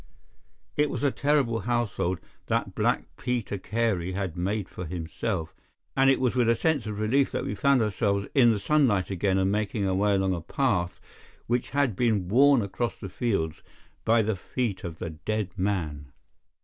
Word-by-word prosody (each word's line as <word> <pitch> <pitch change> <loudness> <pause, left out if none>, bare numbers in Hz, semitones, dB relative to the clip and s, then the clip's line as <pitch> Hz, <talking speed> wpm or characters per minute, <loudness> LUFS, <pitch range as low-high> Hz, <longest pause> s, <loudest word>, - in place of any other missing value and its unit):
It 150 0 +3
was - - -4
a 140 - +3
terrible 140 -6 +1
household 110 -5 -1 0.3
that - - 0
Black - - +1
Peter 120 -5 -2
Carey 95 -4 -1
had 95 -3 -3
made 95 +3 -1
for 90 - -7
himself, 85 +1 -3 0.4
and 135 0 +5
it 135 - +4
was 125 -2 +1
with 120 -2 +3
a 115 - +4
sense 145 -5 0
of 105 -1 -4
relief 130 +6 +2
that - - -3
we - - -2
found 135 +2 +3
ourselves 100 -1 0
in 125 -4 +6
the 105 - 0
sunlight 105 - +2
again 95 +1 +1
and 95 0 +2
making 105 -1 -1
our 95 - +1
way 100 +2 +2
along 95 -1 +1
a 85 - -3
path 95 - 0 0.5
which 120 +1 -1
had 140 -5 +1
been 105 -5 +1
worn 135 +2 +5
across 100 +2 -2
the 95 - -6
fields 90 -7 -1 0.4
by 115 0 +4
the 110 0 0
feet 105 +2 -3
of 80 -2 -6
the 80 - -5
dead 100 +5 -3
man. 80 -8 -2
105 Hz, 180 wpm, -27 LUFS, 95-120 Hz, 0.5 s, in